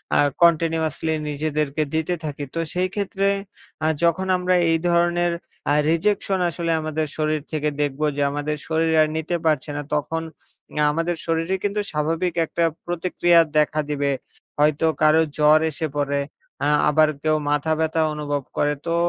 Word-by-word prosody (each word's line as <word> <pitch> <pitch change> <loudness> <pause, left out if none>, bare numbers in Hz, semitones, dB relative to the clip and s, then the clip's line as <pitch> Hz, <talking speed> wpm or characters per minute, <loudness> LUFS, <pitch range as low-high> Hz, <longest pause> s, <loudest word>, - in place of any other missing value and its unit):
আ - - +4 0.2
continuously 160 -1 +2 0.2
নিজেদেরকে 150 0 -1
দিতে 160 +2 0
থাকি। 145 -1 -4
তো - - -1
সেই 180 +1 +1
ক্ষেত্রে 195 -1 -1 0.6
আ - - +3 0.2
যখন 170 +3 +2
আমরা 180 0 +1 0.2
এই 165 - +3
ধরনের 175 0 +2 0.4
আ - - +4 0.2
রিজেকশন 195 +3 +1
আসলে 170 0 -2
আমাদের 155 0 -2
শরীর 155 -1 0
থেকে 150 -1 0
দেখব 145 0 -2 0.2
যে, - - 0
আমাদের 145 +1 -2
শরীর 160 0 +1
আর 155 - +4
নিতে 160 +2 -2
পারছে 155 -2 +1
না - - -2
তখন 160 +2 -1 0.6
আ - - +4
আমাদের 165 +3 -1
শরীরে 165 +3 0
কিন্তু 205 +1 0
স্বাভাবিক 165 +4 -1
একটা 170 - -1 0.2
প্রতিক্রিয়া 175 0 +2 0.2
দেখা 150 0 +2
দিবে। 145 -1 0 0.5
হয়তো 150 +1 +3 0.2
কারো 155 +1 +5 0.2
জ্বর 150 +1 +6
এসে 160 +2 -3
পড়ে। 145 -1 0 0.5
আ - - +2 0.2
আবার 155 +1 +4 0.2
কেউ 155 0 +2
মাথা 150 +2 +1
ব্যথা 160 0 +1
অনুভব 145 -1 -2 0.2
করে। 145 0 +1
তো 165 - +1
160 Hz, 155 wpm, -22 LUFS, 150-170 Hz, 0.6 s, জ্বর